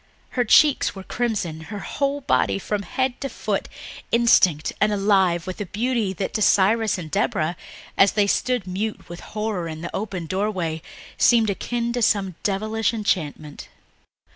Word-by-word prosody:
Her 250 - 0
cheeks 290 +3 +4
were 195 - -8
crimson, 200 -9 -2
her 205 - -5
whole 280 0 -2
body 125 - +1
from 205 - -2
head 260 +4 -2
to 275 - -3
foot - - -3 0.4
instinct 185 -10 +4
and 215 0 +4
alive 195 -4 +2
with 185 +2 -6
a 205 - -4
beauty 225 0 -1
that 190 +1 -4
to 220 - -1
Cyrus 210 +2 +3
and 160 -4 -7
Deborah, 190 -5 0 0.4
as 195 - +6
they 205 -1 +3
stood 245 +1 0
mute 200 +4 -4
with 175 0 -8
horror 210 -5 -3
in 160 -1 -7
the 170 - -6
open 195 -4 -4
doorway, 185 -3 -2 0.4
seemed 225 -4 +4
akin 235 +4 -2
to 245 - -1
some 195 -4 +2
devilish 215 +3 0
enchantment. 155 -8 -3
205 Hz, 160 wpm, -23 LUFS, 180-225 Hz, 0.4 s, as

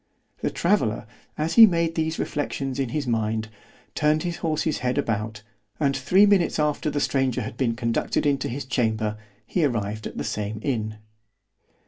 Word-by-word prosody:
The - - 0
traveller, - - +1 0.3
as 155 +2 -1
he 225 -1 +10
made 170 -3 +1
these 160 0 -1
reflections 140 -2 -3
in 135 -3 0
his 145 +3 -2
mind, 110 -2 -1 0.4
turned 150 +1 +2
his 175 -2 -3
horse's 160 -2 -1
head 125 +2 -1
about, 110 -5 -2 0.4
and 140 -3 +2
three 180 +10 +4
minutes 200 -4 +3
after 150 0 0
the 145 - -1
stranger 135 -4 +1
had 110 - -6
been 120 -2 0
conducted 115 +4 -1
into 140 -2 +1
his 130 +3 -4
chamber, 110 -4 0 0.3
he 175 - 0
arrived 110 -5 -1
at - - -10
the - - -2
same 105 0 -3
inn. 110 -6 -2
135 Hz, 165 wpm, -24 LUFS, 110-155 Hz, 0.4 s, he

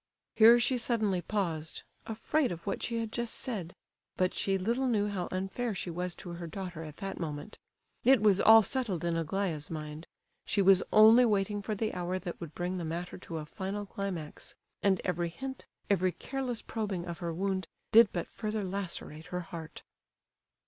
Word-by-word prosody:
Here 230 +2 +8
she 245 +1 +2
suddenly 215 -6 +1
paused, 165 -5 -2 0.2
afraid 255 +5 0
of 170 -1 -7
what 200 - -2
she 235 - -1
had 225 -1 -3
just 235 -1 -1
said. 195 -9 -2 0.4
But 185 0 +2
she 195 -1 +1
little 235 +8 0
knew 210 -4 +2
how 185 -3 -3
unfair 195 +5 -2
she 175 - -3
was 180 +1 -3
to 185 - -9
her 170 0 -6
daughter 180 -1 -6
at 155 -2 -9
that 195 0 -5
moment. 155 +5 -5 0.4
It 265 +1 +6
was 205 -2 +4
all 220 0 +9
settled 205 - -1
in 170 -1 +1
Aglaya's 165 -2 -2
mind. 155 0 -6 0.4
She - - -1
was 195 -1 +6
only 220 +3 +8
waiting 205 -2 +1
for 215 +1 -3
the 215 +1 -2
hour 180 +1 -2
that 180 -1 -6
would 165 -3 -7
bring 180 +1 -2
the - - -3
matter 170 +3 -4
to 170 -2 -6
a 155 - -5
final 195 +4 -4
climax; 190 -6 -6 0.3
and 195 -2 +3
every 175 -1 0
hint, 265 +9 -7 0.2
every 185 -2 +2
careless 255 - -4
probing 205 -6 -3
of 170 -2 -6
her 170 -1 -3
wound, 190 +2 -1 0.2
did 230 -1 +8
but 175 - -3
further 215 -1 -3
lacerate 180 -4 -5
her 180 0 -3
heart. 165 -3 -9
190 Hz, 185 wpm, -31 LUFS, 170-215 Hz, 0.4 s, all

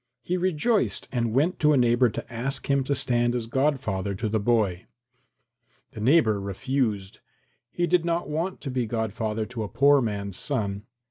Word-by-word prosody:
He 180 - -1
rejoiced 185 +5 0
and 120 -3 -1
went 150 +10 +1
to 150 -1 +4
a - - +3
neighbour 120 0 +4
to 110 - -7
ask 135 +4 -3
him 140 -1 +2
to 140 - 0
stand 120 -1 +1
as 120 -2 -2
godfather 115 -7 -1
to 110 +4 -2
the 110 +1 0
boy. 100 -5 0 1.0
The 110 - -8
neighbour 110 -5 +3
refused. 105 -1 -2 0.5
He 175 +6 -1
did 175 0 +2
not 170 0 -1
want 165 +5 -3
to 135 - -5
be 125 -2 -1
godfather 110 -1 -2
to 120 0 -6
a 105 - -2
poor 140 +1 +4
man's 100 -4 -3
son. 105 -7 -2
120 Hz, 175 wpm, -25 LUFS, 110-145 Hz, 1.0 s, to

